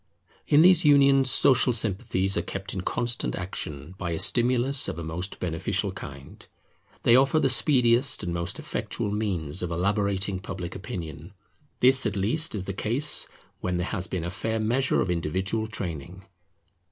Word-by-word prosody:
In 145 +2 +5
these 180 -1 +5
unions 140 -2 +5
social 130 -1 +3
sympathies 95 -3 0
are - - 0
kept 100 0 -6
in 95 - -4
constant 120 +6 +1
action 80 -4 -6
by 85 - -3
a - - -2
stimulus 125 - +2
of - - -5
a 85 - -5
most 85 +5 -5
beneficial 90 +4 -2
kind. 70 -7 -11 0.6
They 115 - +5
offer 135 +4 +3
the - - +2
speediest 125 -2 +3
and 85 - -3
most 85 0 -3
effectual 100 - -4
means 95 -7 -2
of 90 - -3
elaborating 100 +2 -1
Public 90 -1 -7
Opinion: 85 -2 -8 0.5
this 130 -1 +6
at 100 - -4
least 115 +10 0
is 95 -3 -4
the 100 - -4
case 125 +10 -1 0.3
when 90 -1 -2
there 90 - -2
has 95 -3 -4
been 90 -3 -4
a 85 - -4
fair 110 +4 -3
measure 125 +5 +1
of 90 - -1
individual 95 +6 -2
training. 90 -3 -7
100 Hz, 165 wpm, -25 LUFS, 90-120 Hz, 0.6 s, this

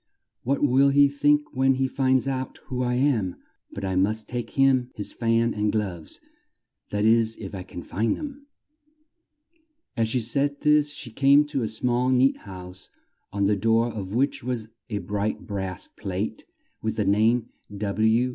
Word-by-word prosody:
"What 140 +3 -1
will 135 0 +5
he 140 +1 +6
think 145 +1 +1
when 135 +1 +3
he 135 0 +1
finds 130 -1 +1
out 130 -1 -3
who 125 -1 -3
I 125 0 0
am! 125 -9 +1 0.4
But 100 - -5
I 95 -1 -1
must 105 +4 0
take 120 -1 -4
him 130 -2 +4
his 105 - -5
fan 115 0 +1
and 105 0 0
gloves 95 -7 -3 0.7
that 105 +1 0
is 115 0 +3
if 100 -2 -8
I 95 - -5
can 90 -1 -9
find 110 +4 -1
them." 285 -1 -8 1.5
As 115 -2 +1
she 125 - +1
said 140 +5 -1
this 150 -1 +4
she 135 -4 -7
came 140 +5 +5
to 145 -2 -2
a 110 - 0
small 120 +3 0
neat 130 +1 +3
house 95 -2 -10 0.4
on 100 0 0
the 105 +1 +3
door 115 +3 +2
of 100 -1 -5
which 135 +1 0
was 120 -3 -3 0.2
a 105 - -2
bright 105 +1 -3
brass 95 -2 -4
plate 100 +1 -5 0.4
with - - -2
the - - 0
name 110 +4 +2 0.3
W. 110 +4 +2
115 Hz, 170 wpm, -25 LUFS, 105-135 Hz, 1.5 s, he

